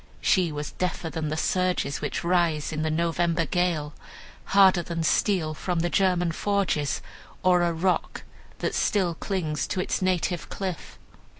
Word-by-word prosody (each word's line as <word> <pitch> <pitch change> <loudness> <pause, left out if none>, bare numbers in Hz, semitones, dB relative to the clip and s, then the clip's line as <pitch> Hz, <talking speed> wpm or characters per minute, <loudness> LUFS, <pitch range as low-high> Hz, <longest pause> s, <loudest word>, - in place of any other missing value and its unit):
She 180 -4 +2
was 150 0 -5
deafer 175 -2 -3
than 155 -2 -3
the 155 - -2
surges 180 -4 0
which - - -3
rise 170 -4 +1
in 155 - -2
the 155 - 0
November 170 +1 +1
gale; 160 -3 0 0.5
harder 190 -2 +5
than 165 -1 -3
steel 160 -2 +1
from 175 +2 -2
the 175 - -1
German 180 -3 +2
forges, 165 -8 0 0.4
or 180 -1 +4
a 170 0 +2
rock 175 +3 -1 0.3
that - - -2
still 185 -5 +1
clings 160 -4 -2
to - - -2
its 185 - -1
native 180 -2 0
cliff. 185 -4 -5
175 Hz, 155 wpm, -26 LUFS, 160-185 Hz, 0.5 s, harder